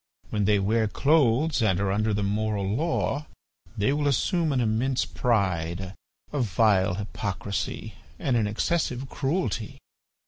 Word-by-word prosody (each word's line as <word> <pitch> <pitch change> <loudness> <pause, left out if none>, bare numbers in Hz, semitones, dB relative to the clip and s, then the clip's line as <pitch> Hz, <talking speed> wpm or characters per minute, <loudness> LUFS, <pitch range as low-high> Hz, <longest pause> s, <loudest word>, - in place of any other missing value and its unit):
When 105 -2 0
they 105 +1 +4
wear 110 +3 +1
clothes 140 +3 +2
and 95 -5 +2
are 100 -1 0
under 105 +2 +1
the 105 0 0
moral 105 0 -1
law 150 - -1 0.5
they 105 +6 +2
will 145 0 0
assume 160 +4 +1
an 135 - +1
immense 120 +3 +1
pride, 95 -5 -1 0.4
a 145 - 0
vile 100 -4 +3
hypocrisy, 100 -2 -4 0.2
and 130 - 0
an 110 -3 +2
excessive 130 +3 -1
cruelty." 135 - -2
110 Hz, 135 wpm, -26 LUFS, 100-135 Hz, 0.5 s, they